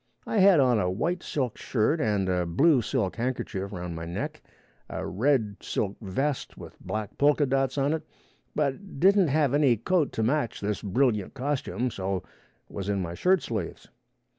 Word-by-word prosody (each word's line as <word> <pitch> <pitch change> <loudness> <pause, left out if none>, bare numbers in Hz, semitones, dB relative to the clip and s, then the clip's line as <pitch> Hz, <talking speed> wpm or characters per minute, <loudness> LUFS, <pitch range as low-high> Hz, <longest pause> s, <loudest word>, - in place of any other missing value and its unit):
I - - -2
had 190 -4 +7
on 125 -4 +4
a 90 - +1
white 170 - -1
silk 130 -6 -3
shirt 135 +7 +1
and 105 -4 +1
a 90 -2 0
blue 135 - +4
silk 110 -4 -1
handkerchief 115 -5 -3
round 90 -3 -5
my 80 0 -5
neck, 85 +1 -4 0.5
a - - -4
red 110 -1 +1
silk 100 -2 -2
vest 130 +8 -2
with - - -10
black 110 -2 -5
polka 145 +1 +4
dots 135 0 0
on 140 +2 +2
it, 160 - -2 0.5
but 150 +3 -2
didn't 195 +1 +5
have 145 -2 +2
any 140 -5 +4
coat 155 - +1
to 110 - -1
match 125 0 0
this 105 -1 -2
brilliant 105 0 0
costume, 130 -4 -2
so 95 -2 -3 0.4
was 100 0 -5
in 100 -1 +1
my 85 -2 -3
shirt 185 - +2
sleeves. 105 -8 -5
125 Hz, 170 wpm, -27 LUFS, 100-145 Hz, 0.5 s, had